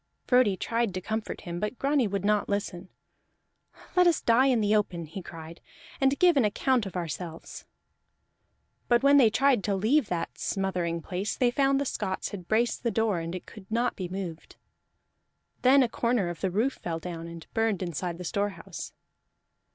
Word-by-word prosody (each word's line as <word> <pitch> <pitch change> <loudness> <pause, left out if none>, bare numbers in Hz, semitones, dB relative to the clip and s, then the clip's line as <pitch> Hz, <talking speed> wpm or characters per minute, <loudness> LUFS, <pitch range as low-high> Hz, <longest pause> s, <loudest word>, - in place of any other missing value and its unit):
Frodi 250 -7 +4
tried 230 -3 -1
to - - -1
comfort 220 +3 -4
him, 175 -1 -5
but 210 +5 -3
Grani 275 -3 +2
would 200 -1 -2
not 210 0 +2
listen. 190 -3 -3 1.1
"Let 360 -1 +6
us 340 - +3
die 240 +3 +4
in 255 -3 +3
the 210 0 +2
open," 180 -5 0
he 165 +5 -7
cried, 165 -1 -10 0.4
"and 270 +1 +3
give 355 -2 +5
an 265 - +5
account 225 +2 +1
of 190 - -9
ourselves!" 170 -1 -6 1.2
But 240 +1 +3
when 280 +1 +6
they 245 -5 +7
tried 265 -1 +3
to 200 - +1
leave 225 +7 +2
that 175 -2 -4
smothering 180 -4 -2
place, 185 +5 -3
they 245 -2 +3
found 275 +1 +2
the 280 - -1
Scots 190 -7 -3
had 185 -4 -8
braced 230 +2 +1
the 235 - 0
door, 220 -5 +1
and 165 +2 -4
it 180 - -7
could 210 -4 -13
not 235 +2 0
be 185 -2 -5
moved. 180 -4 -6 1.1
Then 265 +2 +6
a - - +2
corner 235 -5 0
of 175 - -7
the 190 - +1
roof 225 +9 0
fell 165 -2 -3
down, 165 0 -6
and 170 -1 -9
burned 225 -4 +1
inside 175 0 -3
the 180 - -7
storehouse. 200 +3 -4
205 Hz, 180 wpm, -28 LUFS, 180-240 Hz, 1.2 s, they